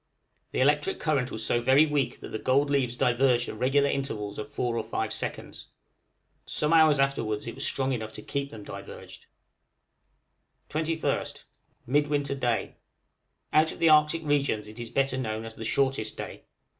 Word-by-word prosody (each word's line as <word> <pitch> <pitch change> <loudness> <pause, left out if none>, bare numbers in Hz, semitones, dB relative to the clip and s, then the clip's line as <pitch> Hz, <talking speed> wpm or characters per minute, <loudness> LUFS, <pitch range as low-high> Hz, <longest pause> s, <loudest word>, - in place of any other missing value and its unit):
The - - -1
electric 150 +2 +2
current 140 -5 0
was 110 0 -2
so 120 - +1
very 135 +5 +5
weak 140 -5 -1
that - - -8
the 110 - -4
gold 140 +4 +2
leaves 130 -4 +1
diverged 125 0 +2
at 110 - -7
regular 140 +3 +3
intervals 110 -8 -3
of 110 - -5
four 125 -4 -2
or 115 - 0
five 110 0 -3
seconds. - - -5 0.8
Some 150 +2 0
hours 155 -3 +6
afterwards 115 -6 0
it 115 - -5
was - - -4
strong 135 0 +1
enough 110 -3 -4
to - - -8
keep 140 0 -3
them 110 -4 -10
diverged. - - -10 1.4
21st. 160 +1 -2 0.4
Midwinter 145 +1 +1
day. 120 -4 -1 0.8
Out 155 +1 +4
of - - -9
the 165 -1 +4
Arctic 155 +1 +4
regions 140 -8 0
it 110 +2 -10
is 120 -1 -6
better 135 0 0
known 110 -2 -3
as 115 - -6
the 110 - -7
shortest 130 -2 0
day. - - -7
135 Hz, 170 wpm, -27 LUFS, 115-145 Hz, 1.4 s, hours